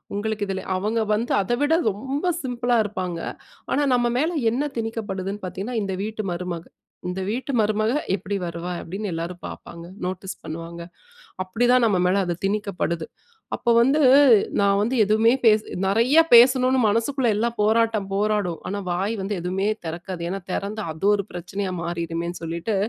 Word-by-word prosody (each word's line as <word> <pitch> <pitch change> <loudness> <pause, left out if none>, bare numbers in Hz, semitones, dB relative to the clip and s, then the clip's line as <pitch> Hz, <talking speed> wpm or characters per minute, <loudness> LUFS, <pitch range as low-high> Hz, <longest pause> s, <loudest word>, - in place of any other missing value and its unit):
உங்களுக்கு 210 0 -2
இதுல 190 -1 -3
அவங்க 215 +4 -1
வந்து 230 +3 -1
அத 195 - -4
விட 290 +2 +3 0.2
ரொம்ப 270 - -2
சிம்பிளா 245 -2 0
இருப்பாங்க. 185 -4 -4 0.5
ஆனா, 290 - +2
நம்ம 240 -1 +2
மேல 315 +6 +1 0.2
என்ன 255 +5 0
திணிக்கப்படுதுன்னு 205 -3 -4
பார்த்தீங்கன்னா, 200 +6 -4
இந்த 195 -1 -3
வீட்டு 215 0 -4
மருமக. 175 -1 -4 0.4
இந்த 180 - -4
வீட்டு 250 +5 -3
மருமக 215 +2 +1 0.2
எப்பிடி 200 +1 -4
வருவா? 170 +1 -5
அப்பிடின்னு 195 +3 -5
எல்லாரும் 170 +2 -5
பார்ப்பாங்க, 170 0 -10 0.2
நோட்டீஸ் 185 +1 -4
பண்ணுவாங்க, 165 +2 -7 0.6
அப்பிடிதான் 240 +5 +3
நம்ம 200 -4 +2
மேல 195 +2 +2
அது 175 - -1
திணிக்கப்படுது. 195 -5 -2 0.5
அப்போ 240 - 0
வந்து 270 +6 +3 0.6
நான் 200 0 +3
வந்து 225 +5 0
எதுவுமே 220 +3 +4
பேசு 215 -1 +5 0.2
நிறையா 235 +10 +4
பேசணும்னு 255 +2 +6
மனசுக்குள்ள 235 +5 +1
எல்லாம் 235 +2 -1
போராட்டம் 220 -1 +2
போராடும். 205 -4 0
ஆனா, 200 - -3
வாய் 195 +5 -1
வந்து 195 +2 -2
எதுமே 185 +3 -1 0.2
திறக்காது. 170 +2 -5
ஏன்னா, 195 +2 -3
திறந்தா, 205 +3 -3
அது 160 +4 -8
ஒரு 200 -1 -1
பிரச்சனையா 185 +2 -4
மாறிருமேன்னு 170 0 -3
சொல்லிட்டு, 170 +6 -3
205 Hz, 150 wpm, -23 LUFS, 180-230 Hz, 0.6 s, பேசணும்னு